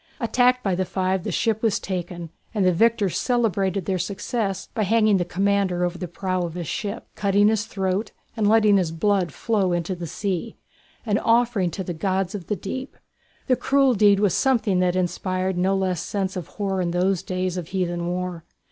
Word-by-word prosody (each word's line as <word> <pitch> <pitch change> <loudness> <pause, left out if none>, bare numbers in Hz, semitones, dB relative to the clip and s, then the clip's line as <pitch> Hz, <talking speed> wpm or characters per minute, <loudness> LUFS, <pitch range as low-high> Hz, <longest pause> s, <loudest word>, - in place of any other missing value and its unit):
Attacked 250 +1 +2
by 195 - +1
the 185 +1 0
five 185 0 -1
the - - -3
ship 220 -1 0
was 225 -3 +1
taken, 175 -3 -5 0.2
and 200 -3 +2
the 185 - +4
victors 215 -1 +2
celebrated 200 -6 0
their 190 -2 -1
success 195 +1 -2
by 225 - -1
hanging 215 0 +3
the 180 - +1
commander 190 -1 +1
over 175 0 -4
the 180 - -4
prow 185 +1 -2
of 170 -1 -4
his 175 -3 -4
ship, 205 +5 -4
cutting 205 +1 +3
his 215 -1 0
throat 195 +1 -2 0.2
and 210 -2 +2
letting 215 -2 +5
his 175 -4 0
blood 180 0 +1
flow 200 -1 0
into 175 +2 -1
the 175 -1 -6
sea, 185 +1 -3 0.5
an 210 -2 +1
offering 230 -5 +2
to 190 +3 -5
the 175 - -4
gods 190 +3 -1
of 190 -5 -6
the 210 - 0
deep. 260 +9 -6 0.5
The 255 - +3
cruel 275 0 +3
deed 205 -2 +4
was 200 -4 +2
something 230 -8 +2
that 180 -1 +2
inspired 185 +1 -1
no 185 +2 +1
particular 190 -1 +1
sense 190 +2 -3
of 175 -3 -5
horror 195 -2 -2
in 175 - 0
those 180 +1 +1
days 185 -1 -2
of 180 -3 -4
heathen 175 -2 -2
war. 180 -1 -3
190 Hz, 195 wpm, -23 LUFS, 180-210 Hz, 0.5 s, letting